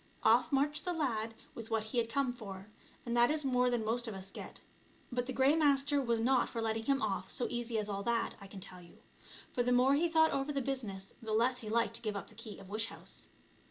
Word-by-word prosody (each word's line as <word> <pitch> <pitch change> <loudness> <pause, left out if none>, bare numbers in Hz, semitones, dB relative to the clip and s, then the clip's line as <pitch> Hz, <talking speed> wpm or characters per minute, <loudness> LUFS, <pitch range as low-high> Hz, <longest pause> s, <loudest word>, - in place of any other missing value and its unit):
Off 230 +3 +5
marched 290 +2 +2
the 360 - -1
lad 225 -8 -1 0.2
with 225 -1 -8
what 225 -1 +1
he 230 +3 -1
had 230 -1 0
come 260 +1 +1
for, 200 -3 -9 0.3
and 235 0 -1
that 240 0 +5
is 305 -1 0
more 250 -1 +3
than 240 -3 0
most 235 +2 0
of 220 - -4
us 190 0 -8
get. - - -8 0.5
But 245 0 -1
the - - -2
Grey 265 +3 +4
Master 285 -2 +3
was 235 -3 +1
not 250 +2 +3
for 230 - -4
letting 225 0 -1
him 275 -1 +2
off 195 -3 -1
so 245 - -1
easy 240 -1 -2
as 210 -1 -1
all 200 -1 -3
that, 230 +2 0
I 200 - -9
can 195 0 -9
tell 185 -1 -7
you, 170 - -16 0.6
for 245 - +1
the 245 +1 +1
more 250 +2 +5
he 330 +4 +3
thought 320 -1 +5
over 275 +2 -1
the 280 - 0
business 225 -8 -4
the 220 -1 -3
less 245 +3 +3
he 220 -4 -6
liked 230 +1 +2
to - - -13
give 215 -3 -2
up 200 - -5
the - - -15
key 215 -1 -8
of 195 - -12
wish 215 +3 -1
house. - - -8
235 Hz, 255 wpm, -34 LUFS, 220-270 Hz, 0.6 s, Off